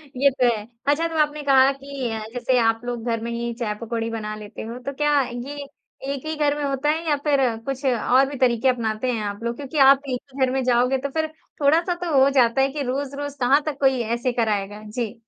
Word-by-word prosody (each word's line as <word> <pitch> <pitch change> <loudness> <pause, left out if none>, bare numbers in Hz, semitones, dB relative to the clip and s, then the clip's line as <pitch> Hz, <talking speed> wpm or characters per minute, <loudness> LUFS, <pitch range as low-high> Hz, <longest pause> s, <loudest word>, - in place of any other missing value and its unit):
ये 280 +2 +4
तो 255 -1 +1
है। 210 0 -8 0.2
अच्छा, 310 +4 +2
तो 325 -1 -5
आपने 300 0 +1
कहा 270 -1 +5
कि 275 -2 -5
अ, 220 - -3
जैसे 250 +1 +1
आप 225 -1 +2
लोग 240 -2 -4
घर 230 -1 -1
में 235 - -4
ही 235 0 -3
चाय-पकौड़ी 230 +1 -3
बना 215 -2 -4
लेते 210 0 -9
हो, 230 +2 -6
तो 275 +3 -5
क्या 295 0 +2
ये 265 +4 -6 0.5
एक 275 +2 -7
ही 315 - -3
घर 295 -1 +1
में 295 - -3
होता 275 +1 0
है, 320 +2 0
या 295 - +4
फिर 285 -2 +3 0.3
कुछ 275 0 -4
और 255 +1 +3
भी 285 - -6
तरीके 245 -1 +2
अपनाते 235 0 -1
हैं 225 -3 -2
आप 205 +2 -5
लोग? 235 0 -2
क्योंकि 285 +4 -6
आप 275 0 +7
एक 250 -1 -1
ही 265 0 +2
घर 255 - -2
में 265 0 0
जाओगे, 250 +1 +2
तो 280 +2 -4
फिर 315 +3 -1 0.3
थोड़ा-सा 325 +5 +3
तो 345 - -2
हो 270 +1 +6
जाता 255 -2 +3
है 270 - +3
कि 295 +1 -4
रोज़-रोज़ 280 +2 -4
कहाँ 270 +4 +4
तक 295 -3 -4
कोई 265 -2 +3
ऐसे 235 +3 -1
कराएगा? 210 -3 -1
जी। 225 -1 -3
260 Hz, 235 wpm, -23 LUFS, 235-280 Hz, 0.5 s, आप